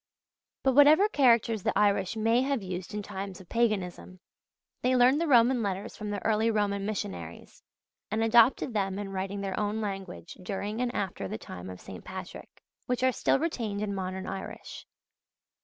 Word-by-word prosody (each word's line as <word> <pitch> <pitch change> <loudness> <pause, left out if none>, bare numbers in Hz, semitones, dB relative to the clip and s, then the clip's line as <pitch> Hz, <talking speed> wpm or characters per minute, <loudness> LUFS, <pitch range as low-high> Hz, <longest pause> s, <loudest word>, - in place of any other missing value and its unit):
But 265 - +3
whatever 300 +8 +7
characters 235 - +3
the - - 0
Irish 200 -1 +2
may 225 +2 +2
have 270 -4 -1
used 185 +1 -5
in 210 - -3
times 195 -1 -6
of 185 - -14
paganism, 190 -5 -1 0.6
they 255 +1 +2
learned 255 +5 +5
the 335 - 0
Roman 245 -2 +5
letters 195 -2 -3
from 210 - -6
the 205 -2 -4
early 220 +1 +2
Roman 200 -2 0
missionaries, 90 - -6 0.5
and 220 +2 0
adopted 235 +2 +4
them 195 -2 -1
in 200 -1 -5
writing 195 +1 -3
their 195 -1 -3
own 210 +1 -1
language 195 -5 -6
during 205 +4 -4
and 250 -1 0
after 190 - -3
the 110 - -4
time 90 -3 -9
of 90 - -8
St. - - -10
Patrick: - - -9 0.2
which 250 0 -1
are 260 - +4
still - - +2
retained 230 -10 -2
in 205 -1 -2
modern 190 0 -4
Irish. 195 - -7
210 Hz, 175 wpm, -29 LUFS, 190-235 Hz, 0.6 s, whatever